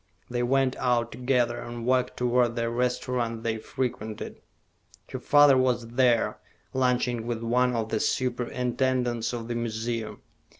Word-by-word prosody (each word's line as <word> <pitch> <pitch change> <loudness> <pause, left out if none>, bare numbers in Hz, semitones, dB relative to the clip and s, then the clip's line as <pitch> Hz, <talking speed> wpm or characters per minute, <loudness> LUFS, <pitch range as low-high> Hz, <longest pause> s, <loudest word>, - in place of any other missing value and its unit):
They 120 0 -1
went 130 +1 +2
out 120 -2 +1
together, 125 -1 0
and 120 -1 -6
walked 125 0 +1
toward 120 -1 +2
the 115 -1 -1
restaurant 120 -1 -1
they 110 -1 -1
frequented. 110 -3 -4 0.7
Her - - -6
father 145 -2 +6
was 125 -2 +1
there, 120 -1 +2 0.3
lunching 125 -2 0
with 115 -1 -3
one 125 +1 +2
of 110 -1 -2
the 110 - 0
superintendents 125 -1 0
of 115 -2 -5
the 120 - -2
museum. 115 -1 -3
120 Hz, 135 wpm, -27 LUFS, 115-125 Hz, 0.7 s, father